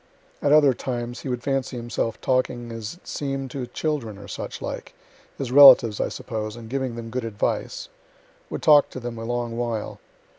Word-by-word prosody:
At 145 - +2
other 145 -3 +6
times 120 -1 -4
he 135 - -6
would 125 -1 -3
fancy 135 -2 -1
himself 115 -1 -3
talking 125 -2 0
as 115 +3 -6
it 175 - -23
seem'd 135 -2 -3
to 130 -2 -4
children 125 -6 -3
or 100 - -11
such - - -6
like, - - -6 0.4
his 130 -3 -4
relatives 130 -6 +8
I - - 0
suppose, 110 -1 -5
and 115 -1 -10
giving 130 -3 -2
them 115 -1 -7
good 125 +1 -2
advice; 110 -3 -2 0.6
would - - -5
talk 145 -2 +6
to - - -7
them 120 -2 -6
a 115 - -5
long 120 -1 -2
while. 115 -2 -3
120 Hz, 185 wpm, -24 LUFS, 115-135 Hz, 0.6 s, relatives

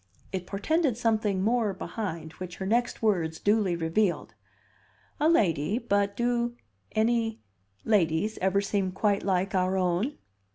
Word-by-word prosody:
It 185 -2 -4
portended 275 - 0
something 215 -5 +1
more 220 -2 +1
behind, 175 -6 -5
which 180 -2 -6
her 190 - -5
next 235 +3 0
words 165 -7 +1
duly 205 -4 +2
revealed. 170 +4 0 0.9
"A 305 +2 +4
lady; 190 - +2
but 200 -4 0
do 240 0 0 0.4
any 225 0 +1 0.5
ladies 205 0 +1
ever 190 +1 +2
seem 195 -2 -1
quite 200 +1 +1
like 190 0 0
our 185 0 +1
own? 185 +10 0
200 Hz, 130 wpm, -28 LUFS, 185-225 Hz, 0.9 s, A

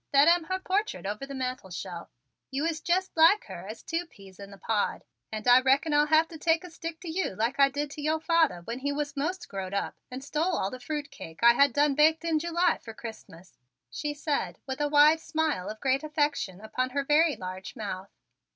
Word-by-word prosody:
That 280 +2 +6
am 340 -1 +4
her 375 +2 -1
portrait 380 - -2
over 210 +7 -4
the 275 - -7
mantelshelf. 255 -9 -5 0.4
You 275 +3 -2
is 330 -1 -2
jest 370 +2 0
like 335 +6 +5
her 175 +3 -9
as 220 +2 -8
two 330 +1 -3
peas 195 - -16
in 200 0 -9
the 200 - -12
pod 210 +2 -1 0.3
and 215 +1 -5
I 245 +1 +8
reckin 275 +4 +2
I'll 295 0 +4
have 315 +2 +4
to 320 -2 -10
take 330 +2 +2
a 360 - -10
stick 330 0 -7
to 360 - -9
you 330 - -2
like 235 +7 -1
I 275 0 +6
did 285 +1 -3
to 295 - -7
yo' 310 +2 +1
father 320 - +2
when 235 +6 -5
he 285 +2 -1
was 290 0 -3
most 345 +7 -3
growed 195 -1 -5
up 200 - -2
and 255 +1 -7
stole 325 +5 0
all 190 - -1
the 255 - -7
fruitcake 280 - -7
I 235 0 +8
had 280 +3 +4
done 290 +3 +3
baked 315 +3 +3
in 320 -2 +2
July 340 +1 +1
fer 225 -1 -10
Christmas," 190 - -11 0.3
she 295 0 -4
said 295 0 -2
with 265 +1 -4
a 295 - +1
wide 300 +2 +6
smile 315 - -1
of 215 - -7
great 270 +2 +1
affection 295 - -1
upon 255 +4 -2
her 280 +2 -1
very 300 +1 +4
large 185 -1 -7
mouth. 200 -4 -5
285 Hz, 220 wpm, -28 LUFS, 225-320 Hz, 0.4 s, I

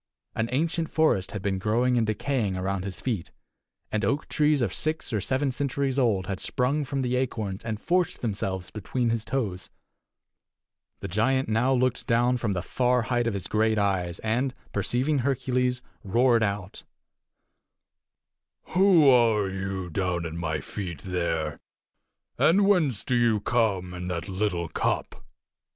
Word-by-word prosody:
An 115 +1 -1
ancient 160 +4 0
forest 155 - +2
had 105 -3 -6
been 95 -2 0
growing 120 +5 +2
and 115 -2 +2
decaying 110 -3 -1
around 95 0 -2
his 95 -3 -6
feet, 105 -5 -3 0.6
and 110 0 -1
oak 145 +2 0
trees 150 -1 +2
of 115 -7 0
six 155 -4 -2
or 105 - +1
seven 135 +6 0
centuries 140 0 -1
old 105 -8 +2
had 95 0 -4
sprung 140 +4 0
from 140 0 -2
the 125 0 0
acorns, 110 -6 -2
and 110 -2 -3
forced 180 +3 0
themselves 95 -5 -3
between 115 +3 -1
his 115 -1 -1
toes. 105 -10 -3 1.3
The - - -4
giant 125 +7 +1
now 115 +4 +2
looked 130 -1 0
down 120 +1 +3
from 115 -4 -1
the 90 -1 -3
far 125 +1 +1
height 120 0 0
of 110 - -1
his 95 -2 -4
great 110 +2 +1
eyes, 95 -4 0
and, 125 +4 0 0.2
perceiving 125 +8 +1
Hercules, 125 -1 0 0.2
roared 120 +3 +3
out: 100 -2 -3 1.9
"Who 180 -5 +5
are 115 -6 +5
you, 95 -2 -4
down 90 -1 -1
at 80 - -5
my 80 -2 -2
feet, 85 -8 -6
there? 85 -4 -2 0.8
And 195 +5 +5
whence 160 - +2
do 125 - 0
you 120 -3 +3
come 100 -5 0
in 90 0 -5
that 85 -3 -3
little 95 -3 -1
cup?" - - -2
115 Hz, 155 wpm, -26 LUFS, 95-130 Hz, 1.9 s, Who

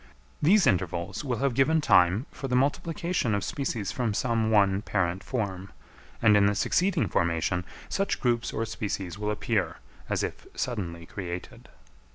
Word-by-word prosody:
These 190 +4 +5
intervals 95 - 0
will 125 -4 -1
have 135 0 +1
given 145 +6 +3
time 95 - +4
for 135 - -6
the 125 - 0
multiplication 145 - 0
of 100 - -1
species 115 -8 -2
from 110 +1 -1
some 115 -2 +1
one 100 -2 +3
parent 95 -4 -1
form: 100 -6 -3 0.5
and 105 -2 +6
in 100 -1 +5
the 100 - +1
succeeding 180 - +1
formation, 85 +1 0 0.2
such 195 0 -1
groups 120 -2 0
or 115 - -2
species 100 -4 -4
will 105 0 -1
appear 105 - -1 0.3
as - - 0
if - - -5
suddenly 85 -9 -3
created. 90 -1 -7
105 Hz, 155 wpm, -27 LUFS, 95-130 Hz, 0.5 s, and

